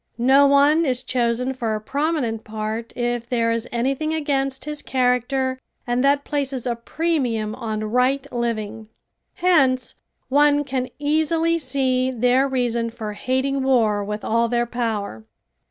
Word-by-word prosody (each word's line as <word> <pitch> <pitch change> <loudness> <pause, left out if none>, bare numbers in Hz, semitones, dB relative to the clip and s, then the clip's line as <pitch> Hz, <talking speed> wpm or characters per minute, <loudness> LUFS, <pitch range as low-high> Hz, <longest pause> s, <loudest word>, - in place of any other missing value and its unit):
No 265 +4 +5
one 285 +4 +4
is 255 -5 -1
chosen 245 +1 0
for 230 -4 -2
a - - -3
prominent 270 -2 -1
part 220 +1 -4
if 240 -1 -1
there 230 -2 +1
is 230 +1 -2
anything 270 +6 -1
against 275 -3 -1
his 300 -1 -3
character 260 +1 0 0.3
and 245 +1 0
that 280 +1 +3
places 275 -4 -2
a 240 -1 0
premium 235 -5 -1
on 220 -3 -4
right 250 +5 +1
living. 225 -2 -3 0.5
Hence 270 -9 +2 0.3
one 290 +2 +4
can 260 -2 -3
easily 320 +3 +1
see 260 -2 0
their 250 +2 +2
reason 240 -3 0
for 220 -2 -6
hating 260 +4 -1
war 225 -6 +2
with 210 +1 -5
all 230 +1 +2
their 240 0 +1
power. 220 - -3
255 Hz, 140 wpm, -22 LUFS, 230-275 Hz, 0.5 s, No